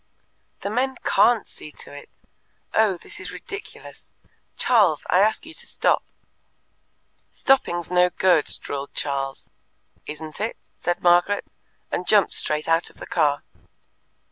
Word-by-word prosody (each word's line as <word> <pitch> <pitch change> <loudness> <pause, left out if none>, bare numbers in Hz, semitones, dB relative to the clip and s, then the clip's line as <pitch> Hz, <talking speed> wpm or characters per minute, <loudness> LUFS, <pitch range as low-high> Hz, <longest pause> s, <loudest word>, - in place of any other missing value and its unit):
"The 200 - -3
men 260 +3 0
CAN'T 235 -3 +4
see 150 - -11
to - - -11
it. 145 - -11 0.6
Oh, 215 -4 +3
this - - -10
is - - -7
ridiculous! 405 0 -10 0.4
Charles, 205 -11 +3
I 180 - +5
ask 215 +8 +2
you 325 - -10
to - - -6
stop." - - +2 1.3
"Stopping's 175 -11 +1
no 180 0 +4
good," 180 -3 +2
drawled 140 0 -5
Charles. 135 -1 -3 0.6
"Isn't 155 +3 -7
it?" 220 - -2 0.2
said 175 0 -2
Margaret, 175 +3 +4 0.5
and 180 - -2
jumped 205 -3 +4
straight 150 0 +1
out 165 +1 +2
of - - -19
the - - -8
car. 145 -3 +1
180 Hz, 135 wpm, -23 LUFS, 155-215 Hz, 1.3 s, I